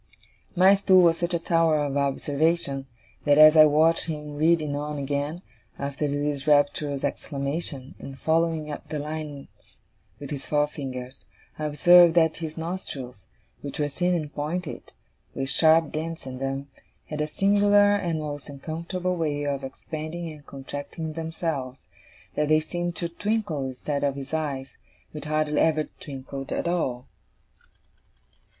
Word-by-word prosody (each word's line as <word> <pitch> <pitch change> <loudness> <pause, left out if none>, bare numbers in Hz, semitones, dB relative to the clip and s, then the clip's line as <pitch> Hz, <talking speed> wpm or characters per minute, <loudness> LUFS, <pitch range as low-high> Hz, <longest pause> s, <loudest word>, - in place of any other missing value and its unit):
My 185 +2 +7
stool 190 -2 +5
was 165 -1 +4
such 175 0 0
a - - 0
tower 165 -2 +2
of 140 -1 -3
observation, 140 0 0 0.4
that 145 -1 +5
as 155 +1 +9
I 155 -1 +9
watched 160 +3 +3
him 150 -2 -5
reading 155 -1 +2
on 150 +1 -3
again, 145 +5 -3 0.3
after 140 +1 -2
this 145 0 -2
rapturous 145 -1 +2
exclamation, 140 -1 -3
and 135 -1 -9
following 160 0 0
up 145 - -8
the 155 - -3
lines 150 -1 -7 0.4
with 145 +1 -8
his 140 -2 -5
forefinger, 135 -4 -2 0.5
I 155 - -2
observed 170 +3 +6
that 160 -2 +4
his 160 -1 -6
nostrils, 140 - -6 0.4
which 140 - -6
were 145 -1 0
thin 180 +4 0
and 150 -3 -3
pointed, 155 +3 -4 0.4
with 135 0 0
sharp 160 +1 +4
dints 160 0 -4
in 130 -1 -7
them, 135 +1 -3 0.4
had 150 0 -4
a 150 - 0
singular 205 +3 +4
and 175 -5 -1
most 145 -1 -6
uncomfortable 170 +6 -3
way 150 -3 -1
of 140 -1 -2
expanding 155 +5 -6
and 150 -2 -12
contracting 145 +4 -6
themselves 160 -5 -4 0.4
that 150 - 0
they 155 +1 +5
seemed 175 +2 -4
to 170 - -2
twinkle 180 -5 -2
instead 140 +3 -3
of 140 -1 +1
his 140 +2 -8
eyes, 140 -4 -3 0.4
which 150 0 -6
hardly 155 0 0
ever 155 -1 +3 0.2
twinkled 135 -1 -7
at - - -1
all. 135 -8 -1
150 Hz, 145 wpm, -26 LUFS, 140-165 Hz, 0.5 s, as